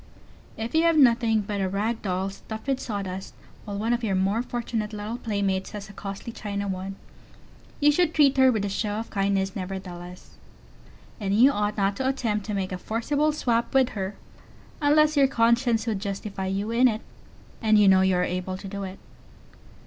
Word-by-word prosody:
If 225 +1 -4
you 320 - +4
have 330 -1 +4
nothing 235 -5 +4
but 200 0 -3
a 190 - 0
rag 215 +4 -1
doll 190 0 -2
stuffed 220 +2 -8
with 270 -1 0
sawdust, 195 -5 -5 0.3
while 205 -2 -5
one 225 +3 0
of 240 0 -1
your 200 -4 0
more 195 +4 +1
fortunate 230 -3 -3
little 215 +3 -5
playmates 200 -3 -1
has 205 -1 -7
a - - -11
costly 200 +3 -7
China 200 -2 -4
one, 190 0 -4 0.8
you 295 0 +5
should 335 +1 +2
treat 290 -4 +4
her 260 -1 +6
with 215 -4 -1
a - - -1
show 205 +1 -2
of 225 +2 -5
kindness 195 -1 0
nevertheless. 180 -2 -7 0.8
And 200 -2 0
you 255 +6 +6
ought 210 -3 -1
not 200 0 +1
to 260 - -1
attempt 220 -6 -1
to 210 - -2
make 190 -1 -2
a 185 - -4
forcible 285 +10 0
swap 240 -5 0
with 260 -2 +5
her 195 -1 -4 0.7
unless 305 +1 +4
your 280 -2 +5
conscience 235 -1 +2
would 220 -4 -1
justify 195 -1 -4
you 200 +3 -2
in 245 +2 +5
it, 220 -2 -1 0.6
and 220 -1 +4
you 205 -1 +6
know 190 -1 +6
you 190 -1 +3
are 180 - +2
able 185 +1 -3
to 195 - -9
do 200 +1 -5
it. 190 0 -6
210 Hz, 195 wpm, -26 LUFS, 195-235 Hz, 0.8 s, her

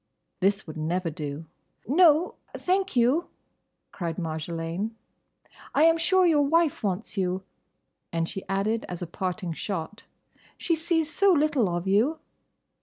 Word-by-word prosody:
This 195 +2 +1
would 155 -1 -8
never 165 +2 -1
do. 150 +1 -6 0.4
"No, 320 - +4 0.2
thank 380 -2 0
you," 255 +8 +3 0.6
cried 170 -3 -4
Marjolaine, 165 +5 -3 0.8
"I 295 - +5
am 330 0 +5
sure 370 +2 +4
your 315 -4 +4
wife 320 +1 +2
wants 200 +1 -2
you." 185 0 -1 0.7
And 165 -1 -1
she 195 - -6
added, 205 +4 0
as 180 0 -5
a - - -2
parting 180 +1 -3
shot, 195 +3 -5 0.5
"She 335 - 0
sees 325 -1 0
so 395 0 +4
little 295 - +2
of 175 +1 -2
you!" 225 +11 +3
205 Hz, 135 wpm, -26 LUFS, -, 0.8 s, I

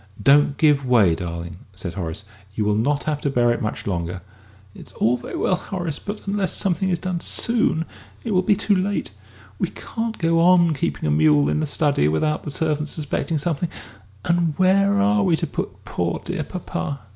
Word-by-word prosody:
"Don't 140 +5 +4
give 145 -3 +3
way, 115 -9 +4
darling!" 85 0 -5 0.2
said 90 -2 -5
Horace; 90 +2 -5 0.3
"you 105 - 0
will 105 - +2
not 140 +7 +1
have 150 -1 -2
to 140 - 0
bear 120 -3 +2
it 120 - -1
much 110 - -3
longer." 90 -1 -3 0.5
"It's - - -12
all 120 +3 +2
very 120 - -7
well, - - +1
Horace, 175 -7 -4
but 205 +1 -7
unless 200 -1 -1
something 190 0 0
is 175 - +1
done 180 +1 -3
soon 195 -4 +1 0.4
it 230 - -3
will 185 -2 +3
be 195 +2 +3
too 205 0 +2
late. 195 +2 -1 0.5
We - - +1
can't 225 -1 -5
go 165 0 +2
on 175 -1 +5
keeping 80 - -2
a 75 - +1
mule 75 -1 +4
in 75 - 0
the 80 - -1
study 145 - +1
without 150 - 0
the - - -6
servants 150 0 -1
suspecting 155 +1 -2
something, 165 +2 -1 0.6
and 170 -3 +1
where 195 +2 +3
are 210 +1 +3
we 180 -4 +3
to - - -2
put - - -6
poor, - - -2
dear - - -3
papa? 125 +12 -5
150 Hz, 190 wpm, -22 LUFS, -, 0.6 s, on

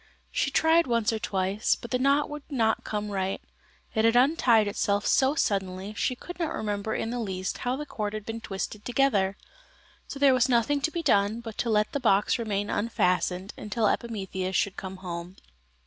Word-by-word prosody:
She - - 0
tried 325 0 +3
once 230 -1 +1
or 220 - -2
twice, 195 0 0
but 235 - -10
the 250 - +1
knot 280 +3 +3
would 295 0 -7
not 225 -6 +1
come 210 -1 -3
right. 190 -1 -1 0.5
It 220 - +1
had 230 +1 +4
untied 245 -5 +4
itself 205 0 0
so 270 +2 +3
suddenly 195 - -1
she 250 +4 -1
could 355 +8 -10
not 325 -2 -1
remember 210 0 -2
in 225 - -2
the 245 - -3
least 190 -4 -3
how 250 +1 -1
the 295 +2 -5
cord 210 -6 -4
had 215 -1 -6
been 225 0 -5
twisted 205 +1 -5
together. 210 -7 +1 0.7
So - - -7
there 275 -1 +5
was 255 0 +3
nothing 250 +4 +2
to 320 - +1
be 335 +1 -4
done 205 -2 +2
but 225 -2 -8
to 235 - 0
let 210 -1 +2
the 285 - -1
box 210 -1 +2
remain 205 -3 -1
unfastened 185 -3 0
until 210 +1 -2
Epimetheus 190 -5 -2
should 200 - +1
come 190 0 -7
home. 175 +1 -6
220 Hz, 195 wpm, -27 LUFS, 200-250 Hz, 0.7 s, there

